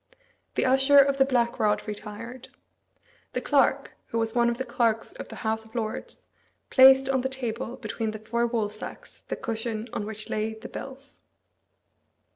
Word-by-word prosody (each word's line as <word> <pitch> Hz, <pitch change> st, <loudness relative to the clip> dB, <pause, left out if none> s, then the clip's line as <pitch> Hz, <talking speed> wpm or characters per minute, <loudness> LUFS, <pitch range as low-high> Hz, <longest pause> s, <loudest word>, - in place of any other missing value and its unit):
The -, -, +1 dB
Usher 270 Hz, +2 st, +5 dB
of 275 Hz, 0 st, +6 dB
the 270 Hz, -, +6 dB
Black 240 Hz, -3 st, +1 dB
Rod 210 Hz, 0 st, +1 dB
retired. 230 Hz, +4 st, -7 dB, 0.8 s
The -, -, -1 dB
clerk, -, -, +2 dB
who 230 Hz, -, -3 dB
was 225 Hz, -1 st, 0 dB
one 235 Hz, -1 st, +3 dB
of 235 Hz, -, -2 dB
the 260 Hz, -, -3 dB
clerks 230 Hz, -2 st, 0 dB
of -, -, -8 dB
the -, -, -9 dB
House 220 Hz, 0 st, 0 dB
of 220 Hz, +1 st, -19 dB
Lords, 220 Hz, -2 st, -4 dB, 0.5 s
placed 265 Hz, 0 st, +8 dB
on 265 Hz, -1 st, +1 dB
the 265 Hz, -, -1 dB
table, 245 Hz, -2 st, -4 dB
between 225 Hz, -2 st, -3 dB
the 215 Hz, -, -5 dB
four 235 Hz, +2 st, -1 dB
woolsacks, 215 Hz, -2 st, -5 dB
the -, -, -2 dB
cushion 225 Hz, 0 st, -4 dB
on 205 Hz, -, -3 dB
which 215 Hz, 0 st, -6 dB
lay 220 Hz, +1 st, -2 dB
the 220 Hz, +2 st, -10 dB
bills. 275 Hz, +1 st, -9 dB
235 Hz, 170 wpm, -27 LUFS, 220-260 Hz, 0.8 s, placed